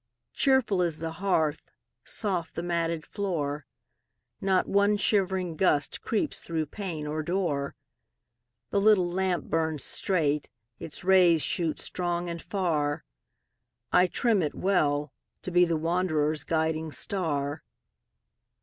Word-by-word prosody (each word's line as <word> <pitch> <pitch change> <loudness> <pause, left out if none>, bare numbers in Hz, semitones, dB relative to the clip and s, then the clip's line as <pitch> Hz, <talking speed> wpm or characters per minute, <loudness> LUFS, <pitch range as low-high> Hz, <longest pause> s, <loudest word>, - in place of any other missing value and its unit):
Cheerful 260 -9 +3
is 170 -3 +1
the 160 0 -4
hearth, 160 -4 0 0.4
soft 185 -6 -2
the 170 - -3
matted 170 -2 -1
floor; 150 -8 -3 0.7
Not 190 -1 +2
one 200 +1 +3
shivering 190 -4 +1
gust 150 -6 +1
creeps 235 +7 -1
through 160 -2 -2
pane 165 -2 -5
or 155 +1 -2
door; 155 -5 -1 1.0
The 200 - +2
little 200 -4 +5
lamp 185 -1 0
burns 160 -2 -1
straight, 150 -6 0 0.3
its 160 - -7
rays 180 -4 +5
shoot 165 -3 -1
strong 175 -1 -2
and 170 -1 -5
far: 155 -7 -1 0.9
I 180 0 +5
trim 220 0 +2
it 150 - -2
well, 150 -7 +1 0.3
to 185 - -4
be 180 0 +5
the 165 -2 0
wanderer's 155 -3 0
guiding 160 -1 0
star. 145 -3 -2
170 Hz, 120 wpm, -28 LUFS, 155-190 Hz, 1.0 s, little